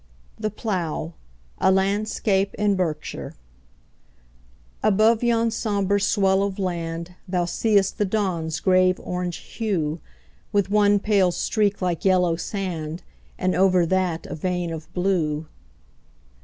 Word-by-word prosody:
The 215 0 -1
Plough 180 -7 -3 0.5
A 190 - +4
LANDSCAPE 195 0 +1
IN 205 -1 +2
BERKSHIRE 165 -5 -3 1.5
ABOVE 215 +3 +3
yon 230 -1 +2
sombre 205 -3 0
swell 195 -1 +3
of 200 -1 -2
land 170 -2 -3
Thou 180 -1 0
see'st 200 +3 +1
the 210 - +3
dawn's 185 -6 -1
grave 185 -1 +3
orange 180 -1 -3
hue, 170 -8 -2 0.5
With 200 -2 +1
one 205 -1 +4
pale 200 -3 +2
streak 205 +2 0
like 175 -2 -1
yellow 180 -3 +3
sand, 170 -3 -4 0.3
And 185 0 0
over 185 -2 +4
that 180 -2 0
a - - -6
vein 175 +1 -2
of 160 -1 -8
blue. 165 -5 0
190 Hz, 120 wpm, -23 LUFS, 175-205 Hz, 1.5 s, A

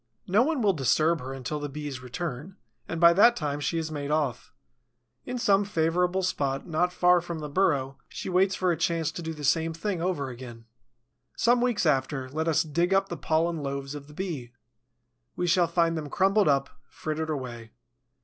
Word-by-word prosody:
No 200 +5 +3
one 280 -2 +1
will 200 -2 +4
disturb 155 +2 +2
her 130 +1 -6
until 135 +3 -4
the 145 0 -4
Bee's 145 -2 -6
return, 155 - -6 0.3
and 165 - -4
by 170 0 +7
that 235 +6 +6
time 145 -7 -2
she 145 +4 -1
has 160 -1 -3
made 145 -2 -4
off. 150 -6 -1 0.8
In 250 - -3
some 200 -4 +3
favorable 180 0 +1
spot, 135 -6 -1
not 180 +1 0
far 180 0 +4
from 170 -1 -5
the 150 -1 -5
burrow, 140 -5 0
she - - -7
waits 190 +1 +2
for 185 -1 +1
a - - +1
chance 165 -1 0
to 170 - -7
do 160 -1 -4
the 150 -2 -8
same 160 +3 +1
thing 180 0 -2
over 170 -7 -1
again. 120 -2 -10 0.7
Some 240 +1 +3
weeks 245 -6 +1
after, 135 -2 +1
let 160 +4 -2
us 160 +1 +3
dig 170 +5 +1
up 195 0 +2
the 170 - -3
pollen 165 +1 0
loaves 140 0 -4
of 145 -1 -8
the 150 - -14
Bee. 150 -11 -5 0.8
We 180 - -1
shall 175 0 +3
find 165 0 +1
them 155 -2 -4
crumbled 195 +4 +3
up, 140 -1 +2 0.2
frittered 155 +1 -4
away. 120 -6 -5
160 Hz, 195 wpm, -27 LUFS, 140-180 Hz, 0.8 s, by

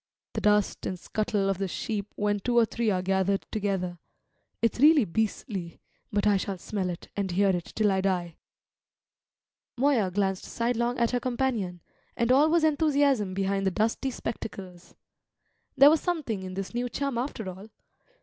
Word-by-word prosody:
The - - -2
dust 210 -1 +2
and 185 - -3
scuttle 205 +1 -1
of 195 -1 0
the 195 - -1
sheep 205 +2 -4
when 205 0 0
two 240 +4 0
or 235 - +6
three 230 0 -1
are 185 -3 0
gathered 190 +1 +1
together; 190 -4 -2 0.6
it's 230 +1 0
really 295 -2 +6
beastly, 195 - -3 0.3
but 205 0 0
I 205 -1 +4
shall 195 0 -3
smell 190 0 -3
it 175 - -7
and 200 -2 -1
hear 195 +3 +2
it 180 -3 0
till 210 -2 +3
I 190 0 +1
die." 180 -4 -1 1.4
Moya 250 -7 +3
glanced 190 0 -1
sidelong 235 +1 -1
at 235 -1 +2
her 250 - +1
companion, 240 -9 -2 0.4
and 235 0 +2
all 285 +4 +5
was 335 0 +3
enthusiasm 285 -9 +2
behind 195 0 0
the 190 - +3
dusty 225 +7 0
spectacles. 190 -7 -7 0.8
There 280 +2 +9
was 315 - +2
something 300 - -2
in 185 0 -7
this 195 +2 -5
new 245 +1 -1
chum 275 -2 -2
after 240 -5 -4
all. 190 +4 -8
210 Hz, 170 wpm, -27 LUFS, 190-245 Hz, 1.4 s, There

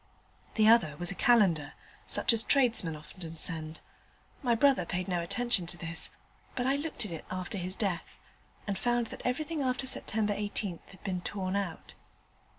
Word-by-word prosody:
The 215 -1 +5
other 175 -11 +5
was 175 +3 +1
a - - -2
calendar, 180 -8 +3 0.3
such - - +3
as 225 - +2
tradesmen 235 - +3
often 160 +2 -9
send. 160 -1 -2 0.6
My 240 -3 +3
brother 270 -4 +4
paid 180 +2 -3
no 180 -2 0
attention 220 0 0
to 175 - -3
this, 165 -1 0 0.5
but 245 - -1
I 270 +1 +3
looked 290 -5 -2
at 200 - -6
it 165 - -6
after 185 +2 -4
his 185 +1 -3
death, 190 -5 -2 0.5
and 200 -2 -2
found 240 -1 +1
that - - -8
everything 300 +5 -1
after 255 0 0
Sept. 220 -4 0
18 205 -3 -2
had 190 - -16
been 185 -2 -2
torn 190 0 -3
out. 195 -5 -3
195 Hz, 170 wpm, -31 LUFS, 175-240 Hz, 0.6 s, The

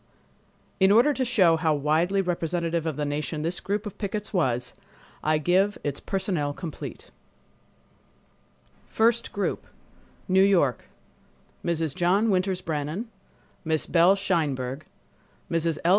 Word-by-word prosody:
In 190 0 +5
order 240 +8 +5
to 265 - -1
show 195 -10 +4
how 155 -1 +1
widely 165 +7 +1
representative 170 -1 -1
of 155 - -2
the 150 - -2
nation 150 +1 -3
this 170 +2 -2
group 205 +2 -2
of 205 - -8
pickets 210 +1 -4
was, 125 -9 0 0.5
I 155 0 +2
give 185 +6 +2
its 145 -1 -3
personnel 180 -7 -2
complete: 165 0 -8 1.8
First 230 +1 +2
Group 200 - -3 0.6
New 190 +1 +4
York—Mrs. 165 - -2
John 195 +5 +2
Winters 185 0 0
Brannan, 160 +8 -3 0.5
Miss 160 -2 0
Belle 175 +3 +5
Sheinberg, 150 -8 -1 0.7
Mrs. 165 -1 0
L. - - +4
170 Hz, 120 wpm, -26 LUFS, 155-195 Hz, 1.8 s, In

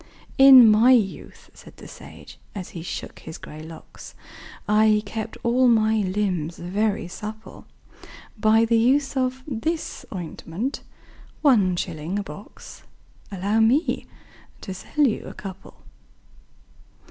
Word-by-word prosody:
"In 265 -3 +9
my 220 +4 +6
youth," 210 -6 -2
said - - -16
the - - -12
sage, - - -13 0.2
as 185 -3 -6
he 170 - -8
shook 170 - -7
his 160 - -9
grey 155 +1 -11
locks, 160 +1 -12 0.5
"I 210 0 +3
kept 220 +2 -6
all 250 +2 +3
my 220 -2 +3
limbs 185 -5 -2
very 195 +2 -2
supple 215 +4 -9 0.7
By 220 +1 +3
the 230 0 +2
use 270 +4 +2
of 260 0 -1
this 305 +4 -4
ointment 185 - -5 0.6
one 210 - +4
shilling 170 +1 -4
a 205 - -2
box 195 +3 -12 0.5
Allow 200 +3 -1
me 245 +9 +1 0.5
to 190 - -6
sell 290 +10 -1
you 230 - -1
a - - -9
couple?" 195 -1 -10
215 Hz, 125 wpm, -23 LUFS, 185-240 Hz, 0.7 s, In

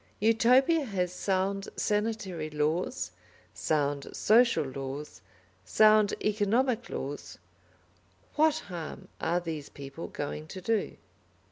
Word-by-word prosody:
Utopia 250 +8 +4
has 185 -7 -2
sound 195 +1 -1
sanitary 205 -7 -1
laws, 155 - -1 0.4
sound 145 -2 -1
social 235 -2 +4
laws, 135 -5 -6 0.4
sound 215 - +5
economic 225 +4 +1
laws; 140 +2 -5 1.0
what 310 0 +4
harm 175 -4 -7
are 170 +2 +1
these 160 -4 -5
people 140 +3 -8
going 150 +1 -5
to 190 - -7
do? 220 +3 -1
190 Hz, 100 wpm, -29 LUFS, 150-220 Hz, 1.0 s, sound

